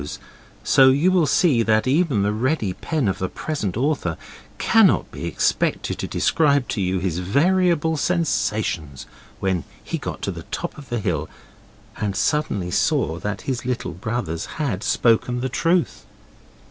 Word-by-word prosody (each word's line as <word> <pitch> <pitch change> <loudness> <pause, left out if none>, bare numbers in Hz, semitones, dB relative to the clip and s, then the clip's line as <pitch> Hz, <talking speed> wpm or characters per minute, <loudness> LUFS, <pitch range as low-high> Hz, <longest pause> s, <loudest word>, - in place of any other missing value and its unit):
's, 75 - -6 0.5
so 130 0 +6
you 145 +8 +3
will 175 -5 +3
see 140 -4 +3
that 110 -1 +2
even 135 - +2
the 105 +1 +1
ready 110 -3 0
pen 150 - -2
of 95 - -1
the 95 - -2
present 110 - -3
author 130 - 0 0.4
cannot - - +3
be - - -6
expected - - 0
to - - -3
describe 145 -5 +2
to 100 - -2
you 95 0 0
his 90 -2 -2
variable 160 - +2
sensations 110 - -1 0.3
when 95 -4 0 0.2
he - - -4
got - - -5
to - - -1
the - - -7
top - - -4
of 145 -3 -12
the 120 -1 -1
hill 80 -6 -2 0.7
and 100 -2 -2
suddenly 100 -7 0
saw 80 -1 +1
that 105 +2 -4
his 130 -1 -3
little 125 -7 -3
brothers 95 -3 -3
had 125 -10 -2
spoken 120 +1 +2
the 130 +1 -2
truth. 155 - 0
120 Hz, 160 wpm, -22 LUFS, 95-150 Hz, 0.7 s, so